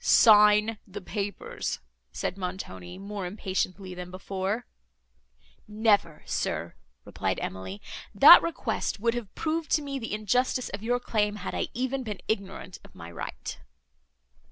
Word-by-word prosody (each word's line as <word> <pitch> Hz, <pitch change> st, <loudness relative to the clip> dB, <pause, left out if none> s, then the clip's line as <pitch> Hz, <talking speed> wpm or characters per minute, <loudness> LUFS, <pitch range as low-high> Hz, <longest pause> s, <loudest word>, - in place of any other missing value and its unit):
"Sign 210 Hz, 0 st, +6 dB
the 195 Hz, -, -7 dB
papers," 200 Hz, +1 st, -4 dB, 0.3 s
said 65 Hz, -, -3 dB
Montoni, 180 Hz, -, -6 dB
more 200 Hz, -1 st, -5 dB
impatiently 190 Hz, -1 st, -3 dB
than 180 Hz, 0 st, -7 dB
before. 190 Hz, +4 st, -3 dB, 1.0 s
"Never, 210 Hz, -7 st, +2 dB
sir," -, -, -2 dB, 0.3 s
replied -, -, -2 dB
Emily; 95 Hz, +2 st, -6 dB, 0.3 s
"that 290 Hz, -, +11 dB
request 335 Hz, -9 st, -2 dB
would 230 Hz, +2 st, +1 dB
have 240 Hz, -5 st, -6 dB
proved 320 Hz, 0 st, -2 dB
to 305 Hz, -, +3 dB
me 275 Hz, -1 st, -4 dB
the 225 Hz, -3 st, -3 dB
injustice 250 Hz, +4 st, +1 dB
of 200 Hz, -, -6 dB
your 245 Hz, +2 st, +1 dB
claim, 210 Hz, -3 st, 0 dB
had 210 Hz, -, -5 dB
I -, -, -1 dB
even 260 Hz, +2 st, -1 dB
been 210 Hz, -5 st, -5 dB
ignorant 195 Hz, -3 st, -3 dB
of -, -, -17 dB
my 85 Hz, 0 st, -9 dB
right." 85 Hz, -, -6 dB
205 Hz, 135 wpm, -28 LUFS, 185-230 Hz, 1.0 s, that